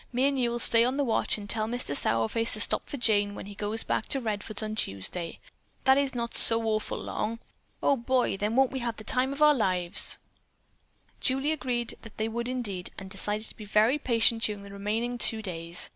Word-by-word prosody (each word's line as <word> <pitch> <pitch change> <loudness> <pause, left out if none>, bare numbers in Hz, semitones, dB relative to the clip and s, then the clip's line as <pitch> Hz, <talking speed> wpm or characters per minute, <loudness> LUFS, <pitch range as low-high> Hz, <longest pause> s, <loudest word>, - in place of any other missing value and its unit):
Me 255 +2 +2
and 275 -1 0
you'll 240 -1 0
stay 230 0 +7
on 255 +3 0
the 285 - +2
watch 230 -3 0
and 205 -1 -8
tell 215 +1 -2
Mister 245 -9 -3
Sourface 140 - +1
to 215 - 0
stop - - +1
for 285 - -4
Jane 205 -4 +1
when - - -7
he 205 - -9
goes 210 +2 -1
back - - -1
to 275 - 0
Redfords 215 -2 -2
on 215 0 -3
Tuesday. 165 - -3 0.5
That 265 0 +6
is 275 -2 0
not 235 -1 -3
so 225 0 +5
awful 215 -1 -1
long. 225 +2 -3 0.5
Oh, 280 - +4
boy, 255 -1 +1
then 210 +3 -2
won't 265 0 +4
we 265 - -3
have 235 -2 -3
the 215 - -9
time 255 +4 0
of 280 +2 0
our 300 0 +7
lives?" 185 -6 0 1.0
Julie 270 +3 +1
agreed 250 -6 -2
that 225 - -13
they 220 - -1
would 235 +2 -3
indeed 205 -8 -3
and 190 -1 -8
decided 210 +2 -2
to - - -8
be 215 - -10
very 215 +7 +3
patient 230 -3 +2
during 210 -3 -1
the 200 - -11
remaining 220 +5 -2
two 225 - +1
days. 170 -4 -1
225 Hz, 215 wpm, -28 LUFS, 205-250 Hz, 1.0 s, stay